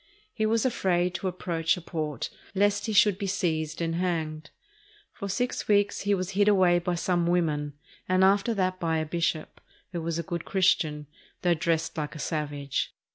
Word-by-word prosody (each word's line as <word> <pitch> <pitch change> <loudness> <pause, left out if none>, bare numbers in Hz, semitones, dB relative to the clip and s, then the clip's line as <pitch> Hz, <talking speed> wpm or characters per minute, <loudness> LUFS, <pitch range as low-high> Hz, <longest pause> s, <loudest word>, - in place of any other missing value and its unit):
He 220 -1 0
was 225 +1 +1
afraid 180 -7 +1
to 175 +2 -3
approach 170 -2 0
a - - -7
port 155 -4 -4 0.2
lest 205 +2 +2
he - - -1
should 205 -2 +4
be 200 - -2
seized 160 -5 -1
and 165 0 -1
hanged. 160 -4 -2 0.6
For 200 - -6
six 245 +6 -2
weeks 205 -1 +3
he 200 0 +2
was 185 0 -3
hid 205 +2 +2
away 185 -4 +5
by 175 0 -1
some 175 0 0
women, 155 -4 0 0.4
and 185 0 +4
after 200 +4 +3
that 185 -2 0
by 165 -2 0
a 155 - -1
bishop, 165 -1 -2 0.3
who 175 -2 -3
was 165 0 -2
a 170 - -2
good 170 -2 -4
Christian, 160 -6 +1 0.4
though 175 -1 +4
dressed 165 0 -1
like 150 +1 -4
a - - -6
savage. 145 -3 -3
175 Hz, 185 wpm, -27 LUFS, 160-195 Hz, 0.6 s, away